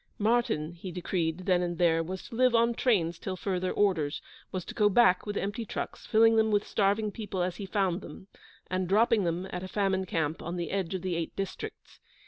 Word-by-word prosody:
Martyn, 215 -8 +1
he 175 +2 -8
decreed, 175 -1 -2
then 180 -2 +3
and 175 -1 -2
there, 165 -1 +3
was 185 +3 -5
to - - -13
live 250 +1 +3
on 235 +1 +4
trains 180 -10 +1
till 190 - -4
further 185 -1 -2
orders; 170 -8 +1 0.3
was 185 -2 -4
to - - -7
go 210 -2 +3
back 205 -3 +4
with 205 - -2
empty 205 +4 -2
trucks, 220 - -6
filling 225 +1 +5
them 220 0 +4
with 205 -1 +2
starving 205 +1 +1
people 200 -4 -3
as 180 0 -2
he 200 - -6
found 190 -2 0
them, 190 - -10 0.4
and 185 -1 -2
dropping 220 0 +4
them 170 +2 -1
at 180 - -4
a 185 - -5
famine 190 -1 0
camp 160 -2 -1
on 170 +2 -4
the 175 - -3
edge 190 -2 -1
of 185 - -4
the 185 -1 -1
Eight 165 -1 -3
Districts. 195 -1 -6
190 Hz, 215 wpm, -29 LUFS, 175-210 Hz, 0.4 s, filling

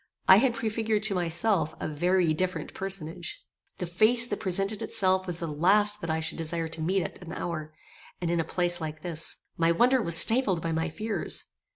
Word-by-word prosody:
I 190 - +8
had 240 +1 +1
prefigured 220 -1 -2
to 215 -2 +2
myself 175 0 0
a - - -4
very 175 +2 0
different 185 +3 -4
personage. 180 -3 -2 0.3
The 180 - -4
face 215 +8 +4
that 210 -4 -5
presented 195 +3 0
itself 190 -3 +1
was 175 -2 -1
the 170 - -4
last 205 +7 +3
that 165 - -5
I 160 0 -1
should 160 - -4
desire 165 0 -2
to 160 0 -6
meet 185 +3 0
at - - -8
an 175 -2 -10
hour, 155 -4 -5 0.5
and 170 -1 -2
in 170 - 0
a - - +1
place 175 +1 -2
like 155 -1 -7
this. 165 -2 -2 0.2
My 165 0 +2
wonder 250 +8 +2
was 170 -5 +5
stifled 225 -6 +5
by 165 0 -4
my 165 +1 -2
fears. 210 +1 -3
180 Hz, 200 wpm, -27 LUFS, 165-210 Hz, 0.5 s, I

